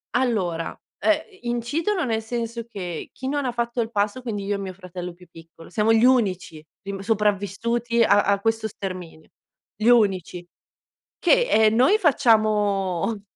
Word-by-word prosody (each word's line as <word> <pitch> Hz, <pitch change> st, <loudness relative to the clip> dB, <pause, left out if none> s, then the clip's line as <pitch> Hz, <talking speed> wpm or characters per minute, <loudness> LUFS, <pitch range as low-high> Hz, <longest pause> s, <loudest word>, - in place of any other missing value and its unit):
Allora, 195 Hz, -10 st, -1 dB, 0.2 s
ehm, 315 Hz, -1 st, +2 dB, 0.2 s
i 245 Hz, -, -8 dB
incidono 310 Hz, -, -1 dB
nel 225 Hz, -2 st, -1 dB
senso 230 Hz, 0 st, -4 dB
che 180 Hz, -7 st, -6 dB
chi 260 Hz, -, -7 dB
non 280 Hz, -2 st, -1 dB
fatto 235 Hz, 0 st, -2 dB
il 225 Hz, -, -3 dB
passo, 210 Hz, +3 st, -1 dB
quindi 215 Hz, -5 st, -4 dB
io 205 Hz, +1 st, -1 dB
e -, -, -2 dB
mio 190 Hz, -1 st, -5 dB
fratello 180 Hz, -1 st, -7 dB
più 180 Hz, +1 st, -18 dB
piccolo, 165 Hz, 0 st, -15 dB
siamo 215 Hz, +2 st, +2 dB
gli 225 Hz, +1 st, +5 dB
unici 190 Hz, -11 st, +1 dB, 0.2 s
rim 195 Hz, -1 st, -5 dB
sopravvissuti 220 Hz, +3 st, 0 dB
a 205 Hz, -1 st, +5 dB
a 200 Hz, 0 st, +2 dB
questo 225 Hz, +1 st, 0 dB
sterminio. 185 Hz, -6 st, -8 dB, 0.5 s
Gli 220 Hz, +2 st, -2 dB
unici 190 Hz, -7 st, +2 dB, 0.7 s
che, -, -, +3 dB
ehm, 220 Hz, 0 st, +4 dB
noi 265 Hz, -, +4 dB
facciamo 210 Hz, -, +2 dB
215 Hz, 155 wpm, -23 LUFS, 195-235 Hz, 0.7 s, gli